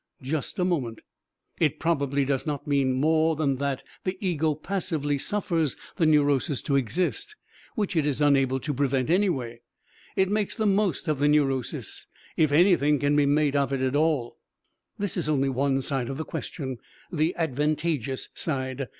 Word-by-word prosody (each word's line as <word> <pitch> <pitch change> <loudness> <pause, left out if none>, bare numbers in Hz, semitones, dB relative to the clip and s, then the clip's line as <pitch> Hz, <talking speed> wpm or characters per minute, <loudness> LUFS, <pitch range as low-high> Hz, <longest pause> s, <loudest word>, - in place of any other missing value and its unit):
Just 140 +2 -3
a 180 - +1
moment! 135 -11 -1 0.6
It 155 -1 +2
probably 140 -4 +1
does 135 +2 -1
not 145 -2 -3
mean 140 -2 +2
more 160 +4 +2
than 140 -3 0
that 135 -1 -2 0.2
the 185 0 -2
ego 160 -5 0
passively 155 -4 -2
suffers 165 -5 -1 0.2
the 165 - +3
neurosis 145 -2 +3
to 140 - 0
exist, 185 - -1 0.4
which 205 -5 -1
it 155 -3 +2
is 145 -1 0
unable 135 -3 +3
to 150 - -2
prevent 135 0 0
anyway. 135 - 0 0.5
It 190 0 +2
makes 210 -1 0
the 220 - -1
most 200 -5 +1
of 150 -3 0
the 145 - +3
neurosis, 135 -4 0 0.3
if 155 -2 +3
anything 150 -2 +4
can 145 +1 +1
be 145 -1 +4
made 145 0 +2
of 140 -1 +1
it 135 -1 -1
at 130 +1 0
all. 150 -6 0 0.6
This 200 -2 -2
is - - -1
only 135 -2 +2
one 135 +1 +1
side 135 -3 -1
of 135 - -4
the 160 - -4
question, 130 -7 -5 0.3
the 160 +1 0
advantageous 150 -3 -1
side. 130 -3 -3
145 Hz, 165 wpm, -26 LUFS, 135-165 Hz, 0.6 s, anything